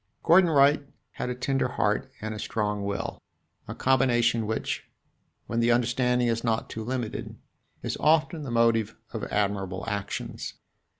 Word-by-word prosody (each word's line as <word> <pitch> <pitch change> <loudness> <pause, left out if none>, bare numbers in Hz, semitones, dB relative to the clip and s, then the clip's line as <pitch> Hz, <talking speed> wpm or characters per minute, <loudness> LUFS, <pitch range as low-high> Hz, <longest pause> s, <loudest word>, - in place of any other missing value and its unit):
Gordon 175 +1 +6
Wright 145 -1 +5 0.3
had - - -4
a 125 - -2
tender 130 +2 0
heart 120 +2 0
and 110 +1 -3
a 105 - -6
strong 105 -2 -1
will 100 0 -3 0.5
a - - -6
combination 120 -4 +2
which, 110 - -3 0.6
when 115 - -2
the 115 +1 +3
understanding 125 +1 +2
is 115 0 0
not 115 -2 -1
too 110 - -5
limited, 120 -1 -4 0.5
is - - -2
often 155 +1 +3
the 140 - -5
motive 115 -2 +2 0.2
of - - -4
admirable 100 -2 -1
actions. 100 -2 -4
115 Hz, 145 wpm, -27 LUFS, 110-130 Hz, 0.6 s, Gordon